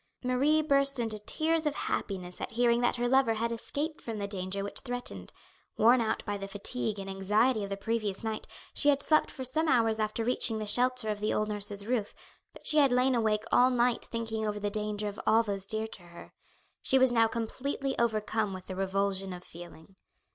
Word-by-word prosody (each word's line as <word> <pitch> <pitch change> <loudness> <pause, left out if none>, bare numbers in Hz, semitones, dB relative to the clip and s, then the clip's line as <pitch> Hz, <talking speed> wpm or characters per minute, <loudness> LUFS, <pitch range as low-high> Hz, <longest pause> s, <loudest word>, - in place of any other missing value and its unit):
Marie 280 +5 +2
burst 275 -2 +2
into 225 -3 -2
tears 315 +8 0
of 295 - -1
happiness 180 -3 -4
at - - -4
hearing 235 0 +3
that 245 - +2
her 245 0 0
lover 255 -3 +3
had 230 +2 -1
escaped 295 +7 -4
from 225 -2 -5
the 200 -1 -3
danger 195 0 -3
which 200 - -1
threatened. 245 - -5 0.5
Worn 235 +3 +5
out 220 - -1
by 205 -1 -2
the 195 - -5
fatigue 210 +2 -3
and 195 -1 -6
anxiety 210 +5 +1
of 200 - -5
the 195 - -3
previous 215 -1 -2
night, 220 -1 -3 0.3
she 290 - +3
had 285 0 +2
slept 310 -1 +4
for 260 - -7
some 315 +6 +3
hours 225 -5 +3
after 215 +1 -1
reaching 230 -1 0
the 215 - -3
shelter 250 +1 +1
of 210 -1 -2
the 210 +1 0
old 215 0 0
nurse's 205 -1 -3
roof, 225 -3 -2 0.4
but - - -16
she 305 - +6
had 280 -3 +5
lain 250 +1 +3
awake 220 -3 +1
all 250 +1 +5
night 245 -1 +1
thinking 225 -2 -3
over 210 0 -2
the 205 0 -2
danger 210 0 -1
of 205 0 -6
all 225 +1 +5
those 200 -3 -2
dear 220 +1 0
to 220 -3 -9
her. 175 0 -13 0.5
She 265 - +3
was 260 -1 +5
now 230 -1 +4
completely 265 +4 -3
overcome 215 -2 0
with 185 0 -9
the 185 - -6
revulsion 195 0 -1
of 180 0 -9
feeling. 175 +2 -12
220 Hz, 210 wpm, -30 LUFS, 205-250 Hz, 0.5 s, she